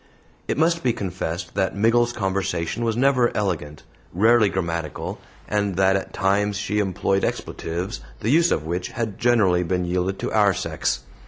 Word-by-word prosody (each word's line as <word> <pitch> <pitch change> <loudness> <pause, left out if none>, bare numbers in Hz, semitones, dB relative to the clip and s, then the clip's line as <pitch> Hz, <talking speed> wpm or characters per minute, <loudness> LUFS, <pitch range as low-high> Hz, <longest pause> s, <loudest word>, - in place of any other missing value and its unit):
It - - -1
must 165 +2 +2
be 125 -2 +1
confessed 90 -4 -4
that 95 0 0
Miggles's 115 +3 +3
conversation 95 0 -1
was 115 -1 0
never 130 -2 +3
elegant, 80 -8 -2 0.3
rarely 110 +2 +5
grammatical, 85 -5 -3 0.3
and 100 -2 0
that 95 +1 +3
at 95 - -3
times 100 +1 +1
she 105 +1 -1
employed 95 0 0
expletives 85 -5 -3 0.2
the 110 - 0
use 170 +3 +4
of 75 - 0
which 90 +2 -2
had 110 -5 -4
generally 105 -7 +3
been 90 +1 -1
yielded 90 +2 -1
to - - -3
our - - +4
sex. - - -2
95 Hz, 160 wpm, -23 LUFS, 90-115 Hz, 0.3 s, rarely